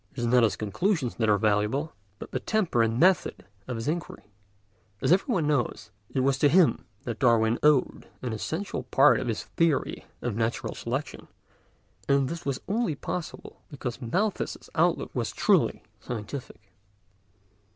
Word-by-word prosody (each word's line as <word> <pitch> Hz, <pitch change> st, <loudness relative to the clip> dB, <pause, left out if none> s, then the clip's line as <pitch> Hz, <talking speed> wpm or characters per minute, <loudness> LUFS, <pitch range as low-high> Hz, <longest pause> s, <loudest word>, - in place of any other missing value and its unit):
It -, -, -26 dB
is 120 Hz, -, -1 dB
not 125 Hz, +1 st, +4 dB
his 115 Hz, -3 st, +3 dB
conclusions 135 Hz, -, -1 dB
that 110 Hz, -2 st, +1 dB
are 105 Hz, -, +5 dB
valuable, 105 Hz, +8 st, 0 dB, 0.2 s
but -, -, -9 dB
the -, -, -1 dB
temper 195 Hz, -, +1 dB
and 115 Hz, +1 st, +1 dB
method 185 Hz, -, +2 dB, 0.2 s
of 125 Hz, -, -3 dB
his 115 Hz, +2 st, -4 dB
inquiry. 160 Hz, -9 st, -4 dB, 0.7 s
As -, -, +1 dB
everyone 190 Hz, -, +2 dB
knows, 120 Hz, -7 st, -1 dB, 0.2 s
it 130 Hz, -, -1 dB
was 135 Hz, 0 st, +1 dB
to 145 Hz, -, +5 dB
him 175 Hz, +1 st, +4 dB, 0.2 s
that 120 Hz, -2 st, -5 dB
Darwin 115 Hz, -3 st, +3 dB
owed 150 Hz, -4 st, +2 dB, 0.2 s
an 125 Hz, -3 st, -2 dB
essential 160 Hz, -, -3 dB
part 135 Hz, +3 st, +4 dB
of -, -, -4 dB
his 115 Hz, -2 st, -2 dB
theory 165 Hz, -4 st, 0 dB, 0.2 s
of 120 Hz, -4 st, -2 dB
natural 115 Hz, +1 st, -1 dB
selection, -, -, -4 dB, 0.8 s
and 140 Hz, -1 st, +3 dB
this 165 Hz, -2 st, -6 dB
was 135 Hz, -2 st, -2 dB
only 205 Hz, -6 st, 0 dB
possible 170 Hz, +4 st, -6 dB
because 130 Hz, -5 st, -6 dB
Malthus's 185 Hz, -, -2 dB
outlook -, -, +1 dB
was -, -, -2 dB
truly -, -, +2 dB, 0.2 s
scientific. 110 Hz, -2 st, -7 dB
130 Hz, 155 wpm, -27 LUFS, 115-160 Hz, 0.8 s, are